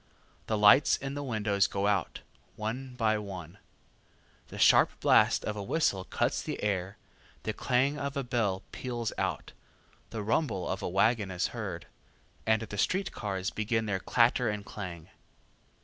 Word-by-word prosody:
The 110 - 0
lights 105 +7 +6
in 135 0 -5
the 145 - -4
windows 105 -6 +1
go 100 0 -2
out, 100 -5 0 0.3
one 125 +4 -5
by 110 -3 +1
one; 95 -3 -8 0.9
the - - -10
sharp - - +6
blast - - +4
of 105 - -2
a 105 - -4
whistle 100 - 0
cuts - - 0
the - - -5
air, 95 -1 -1 0.5
the 110 - -2
clang 135 +6 +1
of 140 0 -3
a 140 - -1
bell 115 -7 -1
peals 120 -3 -4
out, - - -2 0.6
the 110 -2 -5
rumble 110 - 0
of 95 +2 -3
a - - -2
wagon 105 +2 +2
is 90 -1 -1
heard, - - -5 0.6
and 110 0 +3
the 105 -2 -6
street 190 - +1
cars 95 -1 -3
begin 110 +1 -1
their 100 -3 -1
clatter 120 +3 +3
and 105 -1 -4
clang. 90 -6 -7
110 Hz, 160 wpm, -30 LUFS, 100-125 Hz, 0.9 s, lights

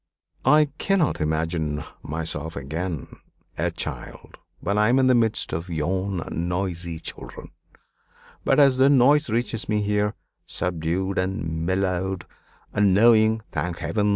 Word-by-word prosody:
"I 150 +1 +5
cannot 185 - +1
imagine 80 -1 -1 0.2
myself 80 0 -4
again 80 +4 -5 0.4
a - - 0
child - - -6 0.2
when 100 - -1
I 105 +1 +4
am 125 - +4
in 130 - +4
the 130 - +5
midst 115 -7 +1
of 80 +3 -4
yon 90 +3 -2
noisy 85 -1 -2
children. - - -8 0.9
But - - +3
as 135 -3 +5
their 135 +1 +6
noise 145 +2 +4
reaches 115 0 -2
me 105 -1 +1
here, 105 +1 0 0.3
subdued 90 +3 -1
and 85 -4 -2
mellowed; 95 0 -1 0.5
and 100 -2 +3
knowing, 110 0 +5
thank 90 -1 -2
Heaven! 100 +6 0
95 Hz, 130 wpm, -24 LUFS, 85-110 Hz, 0.9 s, their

